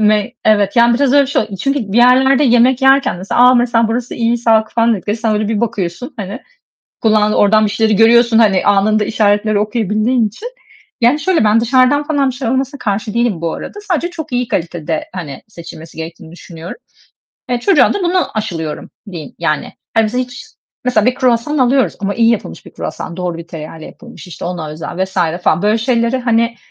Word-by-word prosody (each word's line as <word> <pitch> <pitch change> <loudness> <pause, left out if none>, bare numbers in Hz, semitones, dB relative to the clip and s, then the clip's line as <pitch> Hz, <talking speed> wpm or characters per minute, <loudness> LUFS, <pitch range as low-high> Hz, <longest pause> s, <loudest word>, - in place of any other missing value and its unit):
Ne? 215 +2 +2
Evet, 210 0 +2
yani, 235 0 +5
biraz 270 +1 +1
öyle 285 0 +5
bir 270 - -4
şey 280 - +1
oldu. 210 - -8
Çünkü 275 -7 -2
bir 230 - +2
yerlerde 260 +3 +4
yemek 245 +1 +3
yerken 270 -3 +3
mesela, 190 +6 -1
"A, 250 +1 +7
mesela 240 -2 +2
burası 240 +2 -3
iyi, 235 0 0
sağlıklı." 220 -2 +2
falan 230 0 +3
dediklerinde 210 +3 -4
sen 220 -2 0
öyle 210 0 -1
bir 215 -2 -1
bakıyorsun 225 - -4
hani 205 +3 -6 0.6
kullandığı, 215 -1 +2
oradan 215 +1 +4
bir - - -1
şeyleri 220 0 +1
görüyorsun, 230 +2 +4
hani, 200 -5 +3
anında 210 +1 +2
işaretleri 210 0 +1
okuyabildiğin 215 +2 0
için. 330 - -9 0.5
Yani 245 +6 +3
şöyle, 335 0 +1
ben 215 +1 +3
dışarıdan 255 +4 +2
falan 285 -3 0
bir - - -5
şeyler 255 -3 -3
alınmasına 265 +2 -2
karşı 210 0 -3
değilim 235 -7 0
bu 165 -1 -2
arada. 415 - -8
Sadece 345 0 0
çok 320 -5 -8
iyi 245 0 -1
kalitede, 165 -4 -3
hani, 150 -7 -7
seçilmesi 165 -5 -12
gerektiğini 160 0 -9
düşünüyorum. 170 - -10 0.7
Eee, 245 -1 0
çocuğa 295 -2 +3
da 405 - -3
buna 355 -3 +1
aşılıyorum, 165 -8 -5 0.2
diyeyim 165 -6 -8
yani. 150 +1 -2 0.2
Hani 225 -1 +3
biz 215 - -6
hiç, 250 +1 -4 0.4
mesela 240 -4 +1
bir 250 - +2
kruvasan 250 +4 0
alıyoruz, 255 -6 +2
ama 200 0 -2
iyi 230 0 +3
yapılmış 195 - -4
bir - - -13
kruvasan, 170 - -6
doğru 180 -2 -4
bir 170 - -9
tereyağı 160 0 -8
ile 155 - -10
yapılmış, 240 -3 -13
işte 175 - -9
ona 175 -3 -4
özel 165 +4 -4
vs. 190 0 -14 0.3
falan. - - +2
Böyle 210 +2 +2
şeyleri, 235 +1 0
hani, 235 -1 0
225 Hz, 200 wpm, -15 LUFS, 200-250 Hz, 0.7 s, A